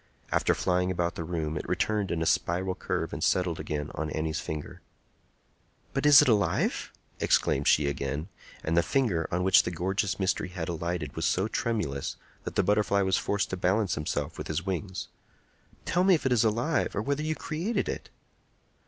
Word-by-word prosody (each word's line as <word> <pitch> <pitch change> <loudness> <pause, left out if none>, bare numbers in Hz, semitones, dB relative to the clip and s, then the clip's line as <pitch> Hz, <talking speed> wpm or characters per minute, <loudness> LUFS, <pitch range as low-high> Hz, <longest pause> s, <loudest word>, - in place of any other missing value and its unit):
After - - +2
flying 90 0 +1
about 85 -2 0
the 85 - -5
room, 80 -2 -3
it 75 - -5
returned 105 -3 0
in 80 -1 -1
a - - -1
spiral 90 +3 +1
curve - - -3
and - - -3
settled 90 -3 +1
again 75 -1 -3
on 75 +1 -3
Annie's 80 0 -2
finger. 75 -1 -6 1.1
"But 135 +2 +1
is 145 -1 +9
it - - 0
alive?" 105 -4 +1 0.3
exclaimed 70 - +2
she 75 - +5
again; 70 +3 -2 0.4
and 80 - 0
the 85 - +5
finger 95 - +1
on 90 +1 0
which 95 0 +6
the - - -3
gorgeous 95 +4 -1
mystery 95 0 0
had 90 -2 -5
alighted 85 -2 -3
was - - -1
so 95 +3 +1
tremulous 105 -14 -2 0.3
that - - -5
the - - +3
butterfly 100 0 +2
was 95 -1 +2
forced 100 -1 -1
to 95 - -2
balance 95 +1 +1
himself 75 0 -3
with - - -5
his 80 +4 -2
wings. 95 0 -3 0.8
"Tell 180 +1 +2
me 190 -1 +6
if 155 - -4
it - - +3
be 115 - +4
alive, 120 +7 0
or 100 - -1
whether 140 +3 -1
you 155 +1 -1
created 170 +12 -2
it." - - -5
90 Hz, 190 wpm, -28 LUFS, 80-105 Hz, 1.1 s, is